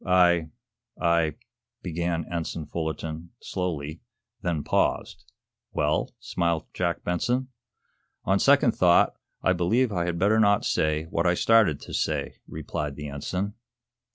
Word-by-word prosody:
"I 90 -3 +4 0.5
I 85 -3 +2 0.2
" - - -64
began 85 -1 -2
Ensign 85 -2 -4
Fullerton, 80 +1 -4
slowly, 80 -4 -4 0.4
then 80 -4 -1
paused. - - -1 0.4
"Well?" - - 0
smiled 85 -2 -1
Jack 85 -1 -1
Benson. 125 +9 0 0.8
"On 95 +1 +3
second 140 -2 +5
thought, 90 -4 +4 0.3
I 95 - +4
believe 110 +8 +2
I 90 -3 0
had 85 -1 -2
better 105 +5 +3
not 100 -1 +4
say 75 0 +1
what 85 +2 +1
I 85 - +3
started 110 -8 +4
to - - -9
say," - - -1
replied 75 -2 -4
the 75 0 -6
ensign. 90 +8 -3
85 Hz, 130 wpm, -26 LUFS, 80-95 Hz, 0.8 s, second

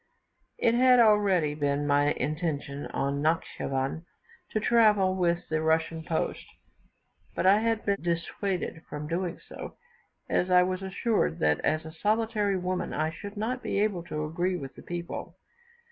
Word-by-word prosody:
It 230 - +3
had 250 +1 +6
already 200 -9 +4
been 145 -1 0
my 145 0 +3
intention 145 -1 -3
in 140 +1 -2
Natschivan 145 -2 -1 0.5
to 215 - -1
travel 210 -5 +4
with 175 -1 0
the 155 0 0
Russian 160 0 +1
post; 160 0 -2 0.9
but - - -1
I 195 +2 +6
had 225 0 0
been 200 -1 0
dissuaded 170 +1 -2
from 150 0 -5
doing 175 +2 -2
so, - - -9 0.5
as 180 - +1
I 180 0 +6
was 185 +1 -2
assured 190 - 0
that, 75 -1 +3
as 155 0 0
a 160 - -7
solitary 210 +1 +1
woman, 180 0 -2
I 155 +1 0
should 205 +5 -9
not 245 +4 -2
be - - -1
able 205 -4 +1
to 155 -2 -3
agree 175 +4 -1
with 135 -6 -6
the - - -12
people. 175 0 -6
175 Hz, 155 wpm, -28 LUFS, 155-205 Hz, 0.9 s, had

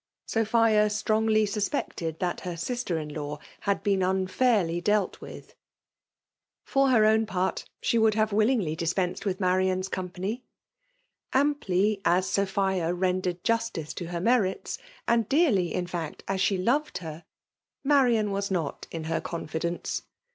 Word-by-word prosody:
Sophia 220 -1 +3
strongly 215 +1 +2
suspected 200 - -2
that 175 0 -2
her 180 -2 -5
sisier 240 0 -2
in4aw 150 0 -5 0.2
had 200 -1 -1
been 195 -2 +2
unfairly 185 -1 +1
dealt 205 +1 +1
with*. - - -10 1.1
For 275 0 +2
her 225 -4 +5
own 220 0 +3
part 185 -2 -1 0.2
she 235 - +2
would 220 -1 +4
have 215 -1 +1
willingly 215 -7 +2
dispensed 180 +4 -1
with 185 -1 -1
Marian's 185 0 +1
company. 190 +6 -4 0.9
Amply] 215 -8 +2
as 180 +2 +3
Sopbia 190 -3 0
rendered 180 -1 0
justice 230 -9 -1
to 175 - -5
her 170 0 -3
merits, 210 -1 +1 0.3
and 230 -2 +2
dearly, 250 - +3
in 180 - -1
fact, 170 -3 -5
as 190 -1 -1
she 195 0 +2
loved 265 +11 0
her, 160 -1 -8 0.6
Marian 245 -7 +3
was 200 0 -2
nof; 170 -7 -2
in 165 -1 -5
her 160 +1 -1
confidence. 170 +1 -3
195 Hz, 135 wpm, -27 LUFS, 180-220 Hz, 1.1 s, her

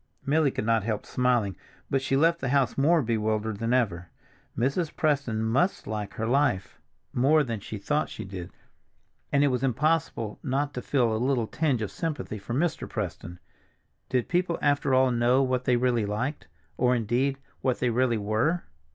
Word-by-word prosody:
Milly 150 +1 +3
could 120 - -3
not 115 -1 +3
help 110 0 -3
smiling, 120 -6 +1 0.3
but 135 - 0
she 135 0 +1
left 165 +3 +3
the 135 - -1
house 140 -1 +2
more 155 +3 +3
bewildered 110 -2 -1
than 115 +1 -1
ever. 95 -9 0 0.5
Mrs. 140 - 0
Preston 140 -8 0
must 135 - +1
like 105 -2 -4
her 110 - -2
life 120 -6 +1 0.3
more 150 +5 +4
than 115 -5 -3
she 105 +2 -7
thought 150 +10 -1
she - - -7
did, 95 -2 -7 0.8
and 140 0 +3
it 145 - +4
was 125 -2 -1
impossible 135 -4 0
not 140 +1 -1
to 125 - -4
feel 120 -6 +1
a 110 - -2
little 130 -3 +1
tinge 135 -2 0
of 105 - -4
sympathy 145 -9 -4
for 110 +5 -5
Mr. 160 +3 -1
Preston. 90 -4 -5 0.7
Did 125 -2 0
people 175 -1 0
after 145 -2 +2
all 130 0 +4
know 120 +3 +3
what 130 -1 -1
they 125 - +3
really 120 -3 +1
liked—or, 120 - -2
indeed, 125 +4 0 0.2
what 130 -2 +1
they 125 - +1
really 120 0 +2
were? 110 +12 0
125 Hz, 175 wpm, -27 LUFS, 110-140 Hz, 0.8 s, more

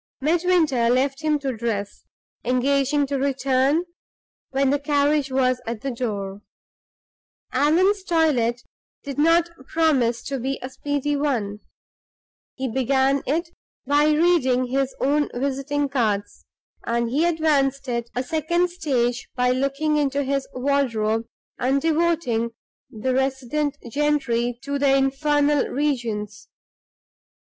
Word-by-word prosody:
Midwinter 315 -5 +2
left 270 +3 +1
him 305 -1 +2
to 270 -3 -3
dress, 215 -3 -4 0.4
engaging 275 +3 +1
to 275 0 -2
return 275 +3 +1 0.6
when 270 0 +1
the 285 - +1
carriage 290 -1 +1
was 255 -1 +1
at 230 -2 -4
the 275 - -3
door. 205 -5 -4 1.1
Allan's 360 +9 +3
toilet 285 -10 +1 0.4
did 280 0 -5
not 335 +2 +4 0.2
promise 270 -8 +1
to 275 -1 -3
be 270 +3 -2
a 255 - -6
speedy 290 +1 -2
one. 235 -8 -1 1.0
He 265 0 -3
began 265 +2 +1
it 325 +5 0 0.4
by 290 +2 +3
reading 300 -5 +3
his 270 0 0
own 295 +2 +1
visiting 280 +2 -1
cards; 220 -7 -2 0.4
and 235 0 -1
he 290 +5 +2
advanced 290 -5 +1
it 235 -1 -2
a 250 - 0
second 340 +5 0
stage 245 -8 -1
by 250 0 +2
looking 275 +4 0
into 285 -1 +1
his 275 0 -1
wardrobe, 230 -5 0 0.3
and 265 +3 +2
devoting 315 -8 0 0.4
the 255 +4 -2
resident 270 +2 -1
gentry 245 -3 0
to 280 0 -2
the 275 -1 +4
infernal 290 +1 +2
regions. 235 -8 -2
275 Hz, 120 wpm, -23 LUFS, 250-295 Hz, 1.1 s, not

